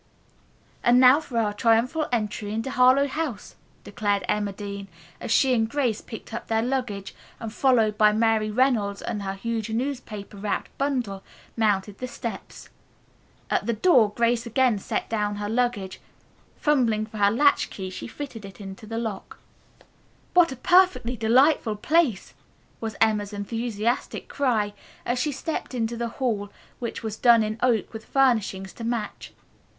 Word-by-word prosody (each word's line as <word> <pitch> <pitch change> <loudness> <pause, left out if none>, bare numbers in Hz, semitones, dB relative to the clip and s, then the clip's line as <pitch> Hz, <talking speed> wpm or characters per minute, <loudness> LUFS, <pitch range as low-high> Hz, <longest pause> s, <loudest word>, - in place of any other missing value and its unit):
"And 245 +1 +5
now 255 +3 +7
for 270 -7 -6
our 215 -2 +1
triumphal 235 +8 +2
entry 210 -2 -2
into 225 +4 -3
Harlowe 255 +3 +5
House," 280 -5 -4 0.3
declaimed 205 -1 -1
Emma 205 -1 0
Dean, 200 0 -7 0.3
as - - -6
she 260 +3 +4
and 225 -2 +1
Grace 245 -5 0
picked 225 - -10
up - - -5
their 225 0 +1
luggage, 245 -6 -3 0.3
and, 225 -2 -6
followed 225 -6 +2
by 210 -1 +6
Mary 220 0 +2
Reynolds 215 -4 +1
and 220 -3 -3
her 195 0 -3
huge 225 +2 -3
newspaper 225 -4 -4
wrapped 205 +1 -3
bundle, 250 -9 -1 0.3
mounted 205 -2 0
the 255 - -4
steps. 235 -2 -7 0.8
At - - 0
the 235 - +2
door 230 - +4
Grace 235 +1 +1
again 235 -2 +2
set - - -3
down 210 -2 -1
her 205 0 -4
luggage. 225 -4 -1 0.6
Fumbling 235 -8 +2
for 215 0 -10
her 200 0 +5
latch 285 +7 +3
key 190 -2 -6
she - - -7
fitted 240 -3 -8
it 195 -1 -10 0.2
to 215 - -13
the 225 +1 -4
lock. 220 -4 -5 1.0
"What 350 -4 +5
a - - -4
perfectly 355 -5 +3
delightful 240 +1 +3
place!" 290 - +1 0.5
was 220 -1 -4
Emma's 210 -2 +1
enthusiastic 225 +2 -2
cry, 225 -7 0 0.3
as 245 +1 0
she 295 +3 0
stepped 285 -1 -4
into 230 -1 -1
the 235 0 -3
hall 215 -6 -1 0.3
which 235 -1 -5
was 220 -1 -4
done 235 -1 +5
in 215 +1 -3
oak 240 -4 +1
with 220 0 -8
furnishings 220 -8 +1
to 230 - -9
match. 230 -2 -4
225 Hz, 155 wpm, -25 LUFS, 210-250 Hz, 1.0 s, now